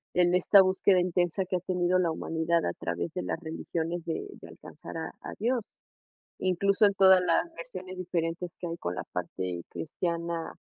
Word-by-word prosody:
en 180 Hz, 0 st, +4 dB
esta 190 Hz, +2 st, +7 dB
búsqueda 185 Hz, 0 st, +3 dB
intensa 180 Hz, +1 st, +1 dB
que 180 Hz, 0 st, -1 dB
ha -, -, -3 dB
tenido 180 Hz, 0 st, +1 dB
la 175 Hz, -2 st, +2 dB
humanidad 165 Hz, +1 st, 0 dB
a 85 Hz, -, -1 dB
través 85 Hz, 0 st, -4 dB
de -, -, -2 dB
las 90 Hz, -, -3 dB
religiones 165 Hz, +1 st, -3 dB
de 165 Hz, -, -3 dB, 0.2 s
de -, -, -10 dB
alcanzar -, -, -10 dB
a -, -, -3 dB
a -, -, -7 dB
Dios?, 235 Hz, -1 st, -2 dB, 0.6 s
incluso 200 Hz, +3 st, +3 dB
en 200 Hz, -, +2 dB
todas 190 Hz, -1 st, +7 dB
las 330 Hz, -, +1 dB
versiones 185 Hz, -, -7 dB
diferentes 170 Hz, -1 st, -3 dB
que 175 Hz, -, -5 dB
hay 165 Hz, -, -4 dB
con 90 Hz, -, -3 dB
la -, -, -3 dB
parte 90 Hz, 0 st, -3 dB
cristiana, 170 Hz, +1 st, -3 dB
175 Hz, 180 wpm, -29 LUFS, 165-185 Hz, 0.6 s, esta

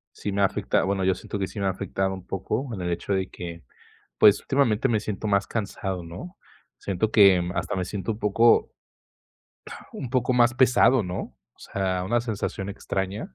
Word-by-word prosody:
sí 100 Hz, -, -4 dB
me 100 Hz, 0 st, 0 dB
ha -, -, +6 dB
afecta 100 Hz, +1 st, +1 dB
bueno, 95 Hz, 0 st, 0 dB
yo 95 Hz, 0 st, +3 dB
siento 105 Hz, -, -6 dB
que 95 Hz, -, -1 dB
sí 105 Hz, -, -9 dB
me 100 Hz, -, 0 dB
ha -, -, +2 dB
afectado 95 Hz, 0 st, -2 dB
un 95 Hz, -, -10 dB
poco 110 Hz, +7 st, -3 dB
en 95 Hz, -, -5 dB
el 90 Hz, -, -2 dB
hecho 85 Hz, +4 st, -2 dB
de 95 Hz, -1 st, -1 dB
que, 85 Hz, -1 st, -8 dB, 0.6 s
pues 105 Hz, +6 st, +6 dB
últimamente 135 Hz, -3 st, +1 dB
me 115 Hz, -3 st, +1 dB
siento 105 Hz, 0 st, -4 dB
más 100 Hz, -1 st, +2 dB
cansado, 95 Hz, -4 st, -4 dB
¿no? 130 Hz, -, -9 dB, 0.4 s
Siento 100 Hz, +3 st, -2 dB
que, 100 Hz, -4 st, +6 dB
mm, 90 Hz, 0 st, -3 dB
hasta -, -, -2 dB
me 90 Hz, -, -2 dB
siento 100 Hz, +3 st, -3 dB
un 105 Hz, -, -11 dB
poco 115 Hz, +3 st, +3 dB, 1.2 s
un 125 Hz, -, -6 dB
poco 130 Hz, 0 st, +1 dB
más 120 Hz, 0 st, +4 dB
pesado, 125 Hz, -1 st, +4 dB
¿no? 90 Hz, -1 st, -5 dB, 0.2 s
O -, -, -41 dB
sea, 95 Hz, -2 st, -2 dB
una 120 Hz, +5 st, +1 dB
sensación 105 Hz, -3 st, -4 dB
extraña. 95 Hz, -5 st, -4 dB
100 Hz, 200 wpm, -25 LUFS, 95-115 Hz, 1.2 s, ha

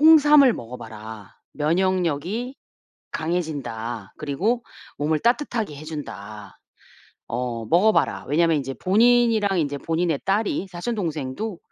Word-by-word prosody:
"홍삼을 295 Hz, -4 st, +7 dB
먹어 120 Hz, -, -7 dB
봐라. 110 Hz, -2 st, -10 dB, 0.2 s
면역력이 185 Hz, -, 0 dB, 0.6 s
강해진다. 125 Hz, -, -3 dB
그리고 200 Hz, -, -1 dB, 0.3 s
몸을 155 Hz, +1 st, +1 dB
따뜻하게 235 Hz, -, 0 dB
해 145 Hz, -, -9 dB
준다. 110 Hz, -10 st, -8 dB, 0.7 s
어 120 Hz, -2 st, -3 dB
먹어 190 Hz, -, +4 dB
봐라." -, -, 0 dB
왜냐하면 165 Hz, +2 st, +3 dB
이제 135 Hz, -1 st, -3 dB
본인이랑 220 Hz, -, +3 dB
이제 145 Hz, -2 st, -1 dB
본인의 165 Hz, 0 st, -1 dB
딸이 200 Hz, -1 st, 0 dB
사촌 180 Hz, +7 st, -3 dB
동생도 165 Hz, +2 st, -3 dB
165 Hz, 275 characters per minute, -23 LUFS, 135-215 Hz, 0.7 s, 홍삼을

